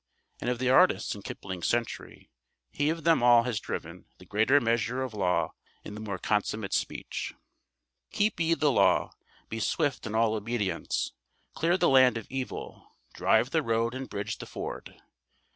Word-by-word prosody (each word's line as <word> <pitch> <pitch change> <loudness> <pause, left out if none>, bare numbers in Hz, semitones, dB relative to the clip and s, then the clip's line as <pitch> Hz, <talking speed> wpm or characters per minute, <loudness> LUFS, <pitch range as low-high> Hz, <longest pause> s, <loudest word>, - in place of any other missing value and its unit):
And 120 - -2
of 125 - 0
the 130 +1 +1
artists 180 +8 +4
in 100 - -9
Kipling's 95 -3 -5
century, 120 -1 -3 0.4
he 145 +1 0
of 165 0 -2
them 165 -5 +4
all 120 -1 +6
has 115 -3 -2
driven - - -6
the - - -15
greater 110 +7 +3
measure 120 +1 0
of 130 -3 -5
law 95 -4 0 0.3
in - - -8
the 105 - -7
more 105 -3 -4
consummate 105 0 -1
speech: - - -3 0.7
Keep 215 -3 0
ye 165 0 +2
the 150 -1 +2
Law - - +3 0.4
be 115 - -5
swift 145 +2 -1
in 110 - -4
all 110 -1 +3
obedience. 105 -5 -2 0.4
Clear 170 +3 +1
the 175 - +3
land 130 -3 +5
of 115 - -6
evil, 130 -1 -6 0.2
drive - - +2
the - - +2
road 115 +1 0
and 130 0 -6
bridge 100 0 -4
the - - -8
ford. - - -7
120 Hz, 170 wpm, -28 LUFS, 110-135 Hz, 0.7 s, all